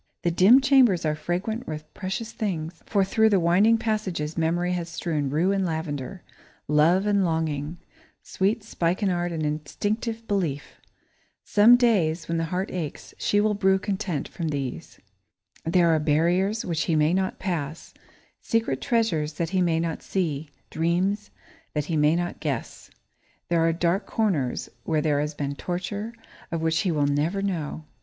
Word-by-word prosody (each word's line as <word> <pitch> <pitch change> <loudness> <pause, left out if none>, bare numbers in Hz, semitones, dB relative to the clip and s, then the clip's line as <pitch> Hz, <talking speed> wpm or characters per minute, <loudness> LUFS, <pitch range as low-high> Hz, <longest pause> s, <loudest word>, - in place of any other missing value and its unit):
The 175 - +2
dim 200 +10 +6
chambers 255 - +4
are 155 - +2
fragrant 180 +9 -3
with 155 -1 -7
precious 205 +4 -4
things, 170 -7 -4
for 200 -2 +2
through 220 +3 +3
the 200 -3 +3
winding 190 +7 +4
passages 210 -9 -2
Memory 170 +2 0
has 170 -2 -3
strewn 160 -4 -2
rue 165 +7 +2
and 195 -1 +1
lavender, 160 -1 -4 0.4
love 160 +6 +4
and 200 -1 +2
longing; 160 -2 -1 0.5
sweet 205 +3 0
spikenard 175 -2 0
and 160 -2 -3
instinctive 210 +10 -3
belief. 170 -9 -2 0.6
Some 220 +3 +6
day, 215 -10 +3
when 165 0 -1
the 165 - 0
heart 180 +4 -3
aches, 165 -5 -5
she 205 - +2
will 210 0 +2
brew 190 -1 +3
content 190 -6 -3
from 170 -3 -5
these. 140 -4 -4 0.7
There 170 +1 +3
are 160 - +3
barriers 175 +8 +1
which 165 -3 -1
he 165 - +1
may 155 +2 +3
not 190 0 0
pass, 165 -5 -4 0.5
secret 225 - 0
treasures 165 - 0
that 165 +1 -3
he 190 -1 +2
may 165 -2 +2
not 165 -1 -2
see, 155 -6 -2 0.2
dreams 185 +6 0 0.5
that 150 -1 0
he 165 - -2
may 150 +1 +4
not 175 0 -3
guess. 140 -7 -4 0.6
There 170 -1 +2
are 165 0 +3
dark 175 +4 0
corners 170 - 0 0.2
where 155 -2 0
there 150 -2 +1
has 150 +1 -2
been 140 -1 -3
torture, 195 +8 -4 0.4
of 165 - -1
which 160 0 +1
he 185 - +1
will 150 -3 +1
never 155 +8 0
know. 160 -5 -3
175 Hz, 160 wpm, -25 LUFS, 155-195 Hz, 0.7 s, dim